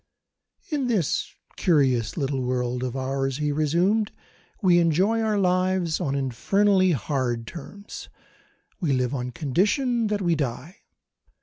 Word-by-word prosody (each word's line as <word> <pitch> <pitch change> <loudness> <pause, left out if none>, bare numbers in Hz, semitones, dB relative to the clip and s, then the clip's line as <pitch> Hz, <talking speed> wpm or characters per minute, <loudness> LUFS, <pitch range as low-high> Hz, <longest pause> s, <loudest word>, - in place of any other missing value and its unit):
"In 285 -4 0
this 205 - 0 0.2
curious 130 -9 +2
little 135 -3 -1
world 125 0 -1
of 130 -1 -3
ours," 135 0 -1
he 150 -1 0
resumed, 175 +9 +1 0.5
"we 180 -5 +4
enjoy 185 +7 +2
our 215 -2 +1
lives 185 -3 +1
on 140 -1 -1
infernally 185 - +2
hard 125 -4 -2
terms. 190 - -9 0.7
We 160 -9 0
live 125 0 0
on 125 -2 -3
condition 210 - +1
that 205 -1 -1
we 170 -1 +2
die. 145 - -3
160 Hz, 125 wpm, -25 LUFS, 130-195 Hz, 0.7 s, we